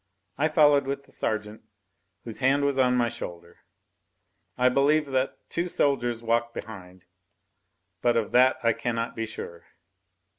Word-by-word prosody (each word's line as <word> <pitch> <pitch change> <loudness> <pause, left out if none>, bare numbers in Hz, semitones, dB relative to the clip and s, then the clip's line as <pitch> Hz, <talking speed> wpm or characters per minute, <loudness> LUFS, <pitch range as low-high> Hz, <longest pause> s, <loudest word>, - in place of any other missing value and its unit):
I 150 +3 +1
followed 145 -3 +4
with 140 0 -3
the - - -21
sergeant, 110 0 -3 0.6
whose 115 -2 -8
hand 135 +2 +2
was 140 -1 0
on 125 -1 +3
my 120 -1 +2
shoulder; 85 -7 -8 1.0
I 125 0 +3
believe 145 +4 +3
that 130 0 0
two 170 +1 -2
soldiers 120 -8 0
walked 115 +1 0
behind, 95 -4 -9 1.0
but 120 -1 +2
of 110 -3 -1
that 130 +1 +4
I 115 -1 +3
cannot 115 +1 -3
be 115 0 -3
sure. 85 -5 -9
120 Hz, 145 wpm, -26 LUFS, 115-140 Hz, 1.0 s, followed